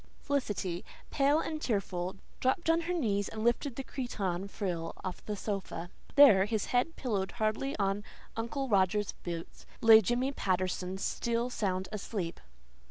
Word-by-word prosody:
Felicity, 205 Hz, -11 st, -1 dB, 0.3 s
pale 285 Hz, +2 st, +3 dB
and 310 Hz, -1 st, -3 dB
tearful, 190 Hz, -6 st, -1 dB, 0.2 s
dropped 295 Hz, +6 st, +2 dB
on 330 Hz, +1 st, +2 dB
her 345 Hz, +2 st, -2 dB
knees 205 Hz, -, 0 dB
and 220 Hz, 0 st, -5 dB
lifted 240 Hz, +3 st, +1 dB
the 270 Hz, -, -4 dB
cretonne 200 Hz, -8 st, -3 dB
frill 175 Hz, -5 st, -3 dB
of 185 Hz, -, -5 dB
the 210 Hz, -, -1 dB
sofa. 190 Hz, -4 st, -4 dB, 0.2 s
There, 250 Hz, -10 st, +8 dB
his 215 Hz, -1 st, -1 dB
head 250 Hz, +7 st, +2 dB
pillowed 200 Hz, -7 st, -2 dB
hardly 240 Hz, +4 st, -1 dB
on 200 Hz, 0 st, 0 dB, 0.3 s
Uncle 265 Hz, +5 st, -2 dB
Roger's 205 Hz, -1 st, +2 dB
boots, 170 Hz, -1 st, -6 dB
lay 225 Hz, -1 st, +9 dB
Jimmy 245 Hz, +6 st, +1 dB
Patterson, 185 Hz, -4 st, -1 dB
still 235 Hz, +4 st, -1 dB
sound 190 Hz, -4 st, -1 dB
asleep! 200 Hz, -4 st, -4 dB
210 Hz, 145 wpm, -31 LUFS, 190-250 Hz, 0.3 s, lay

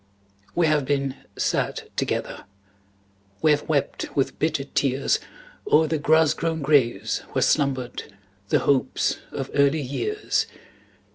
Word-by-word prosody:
We 175 Hz, -, +3 dB
have 155 Hz, -2 st, +2 dB
been 140 Hz, -1 st, 0 dB, 0.2 s
sad -, -, 0 dB
together; -, -, -2 dB, 1.0 s
We 155 Hz, -, +6 dB
have 145 Hz, +1 st, 0 dB
wept 145 Hz, -3 st, 0 dB
with 135 Hz, -, 0 dB
bitter 155 Hz, -3 st, 0 dB
tears 135 Hz, -1 st, +1 dB, 0.5 s
O'er 160 Hz, +1 st, +6 dB
the 155 Hz, 0 st, -1 dB
grass 155 Hz, +1 st, +4 dB
grown 160 Hz, -2 st, -2 dB
graves 140 Hz, -5 st, +2 dB
where -, -, +1 dB
slumbered 130 Hz, -4 st, 0 dB, 0.4 s
The -, -, +4 dB
hopes 135 Hz, -2 st, +1 dB
of 135 Hz, -, -5 dB
early 140 Hz, +2 st, +3 dB
years. 415 Hz, -, -1 dB
145 Hz, 125 wpm, -24 LUFS, 135-160 Hz, 1.0 s, We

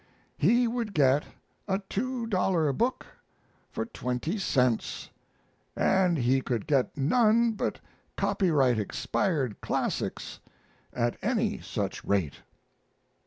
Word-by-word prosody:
He 240 Hz, +9 st, +3 dB
would 230 Hz, -3 st, -3 dB
get 140 Hz, -1 st, +4 dB, 0.4 s
a 190 Hz, -1 st, +1 dB
two 250 Hz, +2 st, -2 dB
dollar 180 Hz, -8 st, +1 dB
book 240 Hz, -, -1 dB, 0.6 s
for -, -, -3 dB
20 125 Hz, -, -3 dB
cents, 125 Hz, -, 0 dB, 0.6 s
and 185 Hz, -3 st, +2 dB
he 130 Hz, +1 st, +2 dB
could 120 Hz, -5 st, -2 dB
get 140 Hz, -2 st, +1 dB
none 230 Hz, -, +3 dB
but 215 Hz, -, -3 dB, 0.4 s
copyright 140 Hz, -, +2 dB
expired 130 Hz, -, -1 dB
classics -, -, -3 dB, 0.5 s
at 120 Hz, -1 st, -1 dB
any 220 Hz, -1 st, 0 dB
such 100 Hz, -4 st, -4 dB
rate. 95 Hz, -8 st, 0 dB
160 Hz, 105 wpm, -28 LUFS, -, 0.6 s, get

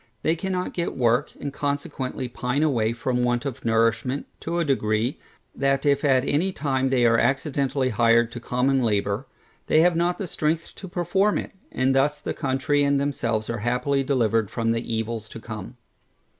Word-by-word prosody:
They 160 Hz, -, +2 dB
cannot 185 Hz, +1 st, -3 dB
get 170 Hz, -4 st, -3 dB
work, 120 Hz, +2 st, +2 dB
and 140 Hz, -1 st, -5 dB
consequently 140 Hz, -3 st, -3 dB
pine 125 Hz, +4 st, -1 dB
away 115 Hz, -8 st, +2 dB
from 125 Hz, +1 st, -1 dB
want 120 Hz, +1 st, 0 dB
of 140 Hz, -1 st, -5 dB
nourishment, 115 Hz, +4 st, +1 dB
to 170 Hz, +1 st, -3 dB
a 170 Hz, -, +1 dB
degree, 115 Hz, -2 st, 0 dB, 0.3 s
that 135 Hz, 0 st, 0 dB
if 140 Hz, -1 st, +3 dB
at 135 Hz, -2 st, +3 dB
any 165 Hz, +8 st, +1 dB
time 135 Hz, -5 st, 0 dB
they 125 Hz, -2 st, +3 dB
are 115 Hz, 0 st, +4 dB
accidentally 135 Hz, 0 st, 0 dB
hired 115 Hz, +1 st, +3 dB
to 120 Hz, -, -6 dB
common 130 Hz, +3 st, +1 dB
labour, 105 Hz, -3 st, 0 dB, 0.4 s
they 155 Hz, -, +5 dB
have 175 Hz, 0 st, +4 dB
not 175 Hz, +3 st, 0 dB
strength 160 Hz, +1 st, -1 dB
to 190 Hz, -, -8 dB
perform 190 Hz, +4 st, +1 dB
it, -, -, -4 dB, 0.2 s
and 130 Hz, +1 st, +1 dB
thus 140 Hz, +2 st, +2 dB
the -, -, -4 dB
country 135 Hz, 0 st, 0 dB
and 140 Hz, 0 st, +2 dB
themselves 120 Hz, -6 st, -1 dB
are 115 Hz, -1 st, -3 dB
happily 125 Hz, +5 st, 0 dB
delivered 115 Hz, -6 st, +1 dB
from 115 Hz, -1 st, -1 dB
the 115 Hz, 0 st, -2 dB
evils 110 Hz, -1 st, -3 dB
to -, -, -9 dB
come. 110 Hz, +1 st, -8 dB
130 Hz, 175 wpm, -24 LUFS, 115-145 Hz, 0.4 s, they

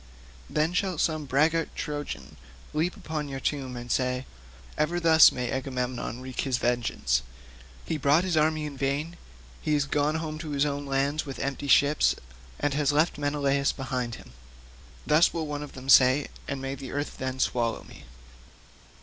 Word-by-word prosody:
Then 155 Hz, +3 st, +1 dB
shall 185 Hz, -2 st, 0 dB
some 155 Hz, -1 st, 0 dB
braggart 155 Hz, +5 st, +1 dB
Trojan 145 Hz, -, -5 dB, 0.4 s
leap 165 Hz, +4 st, 0 dB
upon 155 Hz, -1 st, -4 dB
your 135 Hz, -1 st, -4 dB
tomb 135 Hz, -3 st, -2 dB
and 120 Hz, 0 st, -6 dB
say, 125 Hz, 0 st, 0 dB, 0.5 s
'Ever 170 Hz, +3 st, 0 dB
thus 160 Hz, -2 st, +7 dB
may 125 Hz, -1 st, -3 dB
Agamemnon 125 Hz, -2 st, -3 dB
wreak 130 Hz, -1 st, -4 dB
his 130 Hz, -3 st, 0 dB
vengeance; 120 Hz, -, 0 dB, 0.6 s
he 160 Hz, -, -2 dB
brought 145 Hz, +5 st, +4 dB
his 185 Hz, -3 st, 0 dB
army 155 Hz, 0 st, +2 dB
in 145 Hz, -2 st, -6 dB
vain; 140 Hz, +5 st, -2 dB, 0.5 s
he 155 Hz, -, +1 dB
is 145 Hz, -1 st, +1 dB
gone 145 Hz, +2 st, +1 dB
home 155 Hz, -1 st, -4 dB
to 155 Hz, -1 st, -6 dB
his 145 Hz, 0 st, +1 dB
own 145 Hz, -1 st, -3 dB
land 140 Hz, +3 st, +1 dB
with 135 Hz, -, -6 dB
empty 140 Hz, +1 st, -3 dB
ships, 145 Hz, +2 st, +4 dB, 0.4 s
and 145 Hz, -, 0 dB
has 145 Hz, 0 st, +2 dB
left 155 Hz, +1 st, +2 dB
Menelaus 140 Hz, -1 st, +1 dB
behind 125 Hz, -3 st, -3 dB
him.' 60 Hz, -, -14 dB, 0.7 s
Thus 155 Hz, +3 st, +4 dB
will 165 Hz, -2 st, -1 dB
one 150 Hz, -1 st, -4 dB
of 150 Hz, -, -8 dB
them 130 Hz, 0 st, -10 dB
say, 130 Hz, +1 st, +6 dB, 0.2 s
and 140 Hz, -, -3 dB
may 135 Hz, 0 st, -4 dB
the 135 Hz, -1 st, -7 dB
earth 145 Hz, +1 st, -3 dB
then 130 Hz, 0 st, -3 dB
swallow 120 Hz, -3 st, 0 dB
me." -, -, -14 dB
145 Hz, 170 wpm, -27 LUFS, 130-155 Hz, 0.7 s, thus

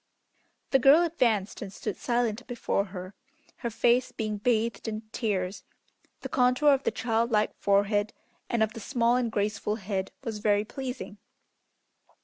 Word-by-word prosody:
The 270 Hz, -, +5 dB
girl 280 Hz, +7 st, +7 dB
advanced 235 Hz, -, 0 dB
and 195 Hz, -, -6 dB
stood 210 Hz, 0 st, -4 dB
silent 240 Hz, -1 st, -1 dB
before 235 Hz, -4 st, -1 dB
her, 185 Hz, -1 st, -8 dB, 0.4 s
her 235 Hz, -, -3 dB
face 240 Hz, +3 st, +2 dB
being 215 Hz, -2 st, -3 dB
bathed 225 Hz, -1 st, 0 dB
in 215 Hz, -1 st, -3 dB
tears. 195 Hz, -5 st, -2 dB, 0.6 s
The -, -, -4 dB
contour 250 Hz, +4 st, +3 dB
of 270 Hz, -, +1 dB
the -, -, +1 dB
child 230 Hz, 0 st, 0 dB
like 215 Hz, -2 st, +2 dB
forehead 205 Hz, +1 st, +2 dB, 0.4 s
and 235 Hz, -2 st, +2 dB
of 220 Hz, -, -1 dB
the -, -, -7 dB
small 240 Hz, +1 st, +1 dB
and 245 Hz, -2 st, 0 dB
graceful 210 Hz, 0 st, -1 dB
head 195 Hz, -2 st, -3 dB
was 225 Hz, -4 st, -4 dB
very 205 Hz, 0 st, +2 dB
pleasing. 250 Hz, -4 st, -6 dB
220 Hz, 150 wpm, -28 LUFS, 205-245 Hz, 0.6 s, girl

